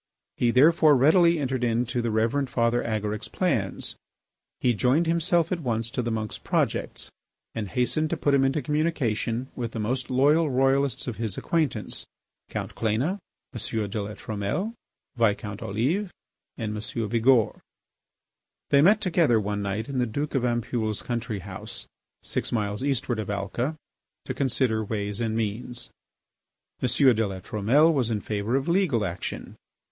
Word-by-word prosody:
He 120 Hz, -, +2 dB
therefore 150 Hz, +4 st, +6 dB
readily 170 Hz, +6 st, +5 dB
entered 130 Hz, -4 st, -1 dB
into 120 Hz, +1 st, 0 dB
the 115 Hz, -, -1 dB
Reverend 115 Hz, +5 st, +1 dB
Father 120 Hz, 0 st, +2 dB
Agaric's 105 Hz, -1 st, -2 dB
plans. -, -, -1 dB, 0.6 s
He 125 Hz, -, +3 dB
joined 130 Hz, +9 st, +2 dB
himself 170 Hz, 0 st, +2 dB
at 180 Hz, -, 0 dB
once 115 Hz, -5 st, -2 dB
to 125 Hz, -, -1 dB
the 120 Hz, -, -2 dB
monk's 110 Hz, -2 st, -3 dB
projects, -, -, -1 dB, 0.4 s
and 110 Hz, -2 st, -3 dB
hastened 125 Hz, +6 st, +1 dB
to -, -, -1 dB
put 145 Hz, -, +1 dB
him 135 Hz, -1 st, +4 dB
into 135 Hz, +2 st, +1 dB
communication 130 Hz, -5 st, 0 dB
with 120 Hz, -2 st, -4 dB
the 115 Hz, -, -4 dB
most 125 Hz, +5 st, -2 dB
loyal 145 Hz, +5 st, +4 dB
Royalists 135 Hz, 0 st, +2 dB
of 120 Hz, -4 st, -4 dB
his 110 Hz, -4 st, -3 dB
acquaintance, 160 Hz, -6 st, -1 dB, 0.4 s
Count -, -, -4 dB
Cléna, 125 Hz, -, 0 dB, 0.3 s
M. 110 Hz, -2 st, -2 dB
de 105 Hz, -, -2 dB
La 105 Hz, +1 st, -6 dB
Trumelle, 110 Hz, -, -3 dB, 0.4 s
Viscount 105 Hz, -3 st, 0 dB
Olive, 150 Hz, -, -1 dB, 0.5 s
and 105 Hz, -2 st, -3 dB
M. 110 Hz, +1 st, -3 dB
Bigourd. 115 Hz, +1 st, +3 dB, 1.1 s
They 140 Hz, -, +6 dB
met 205 Hz, +7 st, +5 dB
together 165 Hz, -, +3 dB
one 105 Hz, 0 st, -2 dB
night 100 Hz, +2 st, -2 dB
in 135 Hz, -2 st, -2 dB
the 125 Hz, -, +1 dB
Duke 145 Hz, +7 st, -3 dB
of 135 Hz, -3 st, +1 dB
Ampoule's 120 Hz, -3 st, -1 dB
country 115 Hz, -4 st, -3 dB
house, 95 Hz, 0 st, -7 dB, 0.4 s
six -, -, -2 dB
miles 105 Hz, 0 st, -1 dB
eastward 130 Hz, -4 st, 0 dB
of 105 Hz, -, -4 dB
Alca, 100 Hz, +9 st, -2 dB, 0.5 s
to -, -, -3 dB
consider 125 Hz, -5 st, +1 dB
ways 105 Hz, 0 st, -3 dB
and 110 Hz, -1 st, -1 dB
means. 120 Hz, +3 st, -3 dB, 0.9 s
M. 125 Hz, -, +2 dB
de 115 Hz, -5 st, +4 dB
La 95 Hz, -1 st, -5 dB
Trumelle 120 Hz, -, +3 dB
was 130 Hz, -6 st, +1 dB
in 110 Hz, -2 st, 0 dB
favour 105 Hz, +3 st, -2 dB
of 135 Hz, 0 st, 0 dB
legal 170 Hz, -, +2 dB
action. 90 Hz, 0 st, -5 dB
120 Hz, 155 wpm, -26 LUFS, 110-140 Hz, 1.1 s, therefore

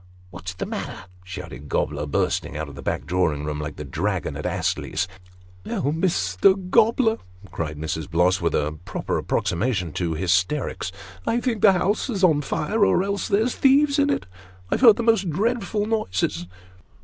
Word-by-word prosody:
" 90 Hz, 0 st, -26 dB
What's 90 Hz, 0 st, -7 dB
the -, -, -3 dB
matter? -, -, -5 dB
" 90 Hz, 0 st, -25 dB
shouted 85 Hz, -5 st, -8 dB
Gobler, 75 Hz, 0 st, -1 dB
bursting 90 Hz, -2 st, -1 dB
out 80 Hz, 0 st, -3 dB
of 70 Hz, -, -10 dB
the 70 Hz, -, -9 dB
back -, -, -2 dB
drawing 80 Hz, -5 st, 0 dB
room, 75 Hz, -1 st, -3 dB
like 75 Hz, -1 st, -5 dB
the -, -, -6 dB
dragon -, -, -2 dB
at -, -, -3 dB
Astley's. 95 Hz, -, -1 dB, 0.3 s
" 90 Hz, 0 st, -25 dB
Oh, 140 Hz, -, -1 dB
Mr. 160 Hz, -, +2 dB, 0.2 s
Gobler! 225 Hz, +1 st, +4 dB, 0.2 s
" 95 Hz, -1 st, -17 dB
cried 80 Hz, -3 st, -4 dB
Mrs. 80 Hz, 0 st, -4 dB
Bloss, 90 Hz, +3 st, +2 dB
with 85 Hz, -, +1 dB
a 75 Hz, +1 st, -1 dB
proper -, -, -2 dB
approximation 95 Hz, -4 st, -1 dB
to 85 Hz, -3 st, -1 dB
hysterics; 90 Hz, -, 0 dB, 0.2 s
" 95 Hz, 0 st, -20 dB
I 235 Hz, -, +2 dB
think 235 Hz, -4 st, -1 dB
the 195 Hz, -, +7 dB
house 190 Hz, +7 st, 0 dB
is 200 Hz, -5 st, -2 dB
on 155 Hz, -5 st, +5 dB
fire, 160 Hz, +9 st, 0 dB
or 185 Hz, -, +4 dB
else 200 Hz, 0 st, -2 dB
there's 220 Hz, +5 st, +2 dB
thieves 280 Hz, +2 st, +4 dB
in 285 Hz, 0 st, +3 dB
it. 285 Hz, -, 0 dB, 0.5 s
I -, -, +3 dB
have -, -, 0 dB
heard 230 Hz, -5 st, +9 dB
the 235 Hz, -, -2 dB
most 225 Hz, -5 st, +3 dB
dreadful 210 Hz, +3 st, 0 dB
noises 95 Hz, -, -1 dB
95 Hz, 190 wpm, -24 LUFS, -, 0.5 s, heard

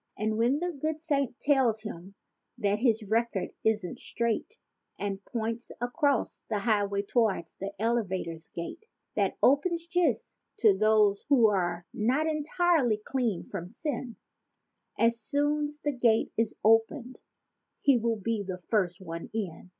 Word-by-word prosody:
47 215 Hz, +1 st, 0 dB
And 215 Hz, -, -2 dB
when 250 Hz, +5 st, +3 dB
the -, -, -13 dB
good 310 Hz, 0 st, -1 dB
Saint 280 Hz, -5 st, -1 dB
tells 260 Hz, -7 st, +2 dB
him 195 Hz, -2 st, -8 dB, 0.4 s
that 205 Hz, -2 st, +1 dB
his 225 Hz, -2 st, +2 dB
record 220 Hz, -1 st, 0 dB
isn't 210 Hz, -5 st, 0 dB
straight 235 Hz, -, -2 dB, 0.4 s
And 200 Hz, -1 st, -3 dB
points 230 Hz, 0 st, -3 dB
across 265 Hz, +2 st, 0 dB
the 215 Hz, -, 0 dB
highway 200 Hz, -2 st, +1 dB
towards 205 Hz, -6 st, 0 dB
the 195 Hz, +1 st, -5 dB
eleva¬ 220 Hz, -4 st, 0 dB
tor's 165 Hz, 0 st, -8 dB
gate 170 Hz, -, -6 dB, 0.3 s
That -, -, +1 dB
opens 330 Hz, +5 st, +3 dB
just 335 Hz, -9 st, 0 dB, 0.2 s
to 215 Hz, -4 st, +5 dB
those 210 Hz, -1 st, +3 dB
who're 190 Hz, -10 st, +3 dB
not 255 Hz, +8 st, +1 dB
entirely 310 Hz, -5 st, +2 dB
cleansed 225 Hz, -3 st, -2 dB
from 180 Hz, -4 st, -4 dB
sin 250 Hz, -, -4 dB, 0.8 s
As 230 Hz, 0 st, +3 dB
soon's 295 Hz, +4 st, -1 dB
the 295 Hz, -, 0 dB
gate 240 Hz, -4 st, +2 dB
is 225 Hz, -1 st, 0 dB
opened 230 Hz, +4 st, +2 dB, 0.6 s
he 275 Hz, -4 st, +5 dB
will 230 Hz, 0 st, 0 dB
be 220 Hz, +1 st, -1 dB
the 185 Hz, -2 st, -5 dB
first 190 Hz, -4 st, +1 dB
one 165 Hz, -2 st, -6 dB
in. 185 Hz, -4 st, -4 dB
225 Hz, 140 wpm, -29 LUFS, 200-270 Hz, 0.8 s, to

